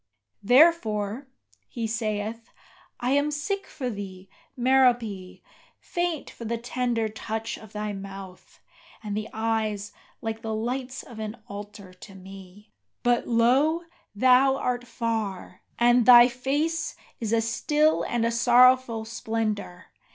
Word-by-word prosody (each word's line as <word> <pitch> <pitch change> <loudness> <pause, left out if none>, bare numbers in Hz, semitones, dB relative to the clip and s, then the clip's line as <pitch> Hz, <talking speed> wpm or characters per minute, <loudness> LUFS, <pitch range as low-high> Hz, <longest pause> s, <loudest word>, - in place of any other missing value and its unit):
Therefore," 245 -3 +3 0.4
he 230 -2 -4
saith, 220 0 -3 0.5
"I 250 +1 -1
am 285 +2 +2
sick 345 +7 -3
for 270 -5 -5
thee, 195 -4 -7 0.3
Merope, 240 -7 +1 0.4
faint 345 -4 -3
for - - -11
the 230 +1 -2
tender 240 -1 -1
Touch 220 +1 -5
of 215 -2 -13
thy 210 -1 -4
mouth, 195 -1 -10 0.4
and 205 -1 -4
the 215 +1 -4
eyes 220 -2 -2 0.3
like 225 -1 -4
the 220 -1 -3
lights 255 +4 -4
of 230 -3 -12
an 215 +1 -5
altar 200 -2 -9
to 195 +2 -14
me; 195 +2 -13 0.3
But, 240 0 +2
lo, 265 +8 +3 0.3
thou 255 +4 +5
art 245 -2 -2
far; 215 -7 -4 0.2
and 240 +1 +4
thy 240 0 +9
face 295 +6 -2 0.2
is 225 -2 -3
a 230 - +3
still 295 +7 +1
and 235 -1 -1
a 230 - +1
sorrowful 245 -1 +4
splendour! 220 - -4
230 Hz, 130 wpm, -26 LUFS, 210-250 Hz, 0.5 s, thy